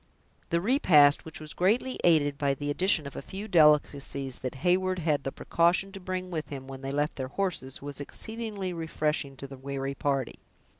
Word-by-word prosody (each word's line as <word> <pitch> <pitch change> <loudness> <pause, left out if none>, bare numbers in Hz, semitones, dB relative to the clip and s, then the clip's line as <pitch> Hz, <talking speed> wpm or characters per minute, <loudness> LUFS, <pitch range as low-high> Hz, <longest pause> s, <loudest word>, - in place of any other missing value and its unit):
The 170 - +2
repast, 170 - +5
which 160 +1 -8
was 155 -1 -9
greatly 230 +8 +1
aided 145 -4 +3
by 140 -1 +1
the 145 +1 -3
addition 175 -1 +2
of 140 - -8
a - - -5
few 195 +8 -7
delicacies 145 - +3
that 130 +1 -4
Heyward 185 +1 +2
had 150 -4 0
the 135 - -3
precaution 175 +6 +1
to 195 - -8
bring 185 0 -4
with 155 -3 -4
him 135 -2 -7
when 135 -1 -8
they 135 - -4
left 145 +2 -1
their 130 -1 -3
horses, 140 -5 -3
was 145 0 -6
exceedingly 210 +2 -5
refreshing 155 -4 -2
to 140 - -7
the 135 0 -9
weary 135 0 -3
party. 135 -2 -1
150 Hz, 190 wpm, -28 LUFS, 140-185 Hz, -, repast